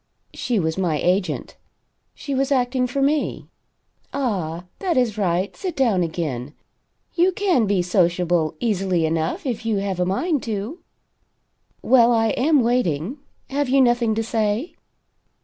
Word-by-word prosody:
She 245 Hz, -3 st, -1 dB
was 160 Hz, +1 st, -1 dB
my 170 Hz, -5 st, +1 dB
agent. 180 Hz, +4 st, -1 dB, 0.6 s
She 280 Hz, -, -5 dB
was 270 Hz, +1 st, 0 dB
acting 250 Hz, -1 st, +1 dB
for 275 Hz, +3 st, -1 dB
me. 295 Hz, +2 st, 0 dB, 0.7 s
Ah, 185 Hz, -, -2 dB, 0.2 s
that 360 Hz, -6 st, 0 dB
is 240 Hz, -5 st, +2 dB
right 185 Hz, -2 st, -1 dB
sit 365 Hz, -4 st, -4 dB
down 230 Hz, -9 st, +2 dB
again. 155 Hz, -5 st, -3 dB, 0.6 s
You 360 Hz, +2 st, +3 dB
can 360 Hz, -, +1 dB
be 195 Hz, -3 st, +1 dB
sociable, 175 Hz, -3 st, +1 dB
easily 190 Hz, -6 st, 0 dB
enough 160 Hz, -, -1 dB
if 235 Hz, -4 st, -3 dB
you 225 Hz, -2 st, 0 dB
have 195 Hz, -2 st, -2 dB
a 180 Hz, -, +2 dB
mind 290 Hz, -, 0 dB
to. 220 Hz, -, -4 dB, 1.0 s
Well? 240 Hz, -2 st, +5 dB
I 225 Hz, -1 st, +3 dB
am 275 Hz, +4 st, +3 dB
waiting. 230 Hz, -, 0 dB, 0.3 s
Have 280 Hz, -1 st, 0 dB
you 275 Hz, +1 st, +4 dB
nothing 240 Hz, -3 st, +3 dB
to 225 Hz, -, 0 dB
say?" 220 Hz, -, -1 dB
220 Hz, 145 wpm, -22 LUFS, 180-260 Hz, 1.0 s, Well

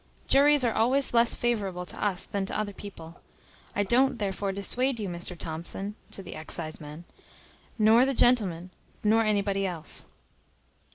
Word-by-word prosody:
Juries 285 Hz, 0 st, +5 dB
are 235 Hz, -2 st, +1 dB
always 260 Hz, +5 st, +2 dB
less 235 Hz, 0 st, +4 dB
favourable 200 Hz, -7 st, -1 dB
to -, -, -3 dB
us 195 Hz, -3 st, 0 dB
than 200 Hz, -2 st, -3 dB
to -, -, -1 dB
other 205 Hz, -1 st, -3 dB
people. 175 Hz, -5 st, -11 dB, 0.5 s
I 205 Hz, -, +2 dB
don't 245 Hz, +5 st, +3 dB
therefore 200 Hz, -1 st, -2 dB
dissuade 240 Hz, +6 st, -1 dB
you, 205 Hz, -, -3 dB
Mr 175 Hz, 0 st, -5 dB
Thomson 170 Hz, +5 st, -4 dB, 0.2 s
(to 195 Hz, -, -2 dB
the 180 Hz, -, -8 dB
exciseman), 155 Hz, 0 st, -6 dB, 0.7 s
nor 220 Hz, +2 st, +6 dB
the 270 Hz, 0 st, 0 dB
gentleman, 185 Hz, -9 st, +2 dB, 0.3 s
nor 220 Hz, +2 st, +4 dB
anybody 200 Hz, -2 st, 0 dB
else." 165 Hz, -4 st, -3 dB
200 Hz, 150 wpm, -27 LUFS, 180-235 Hz, 0.7 s, nor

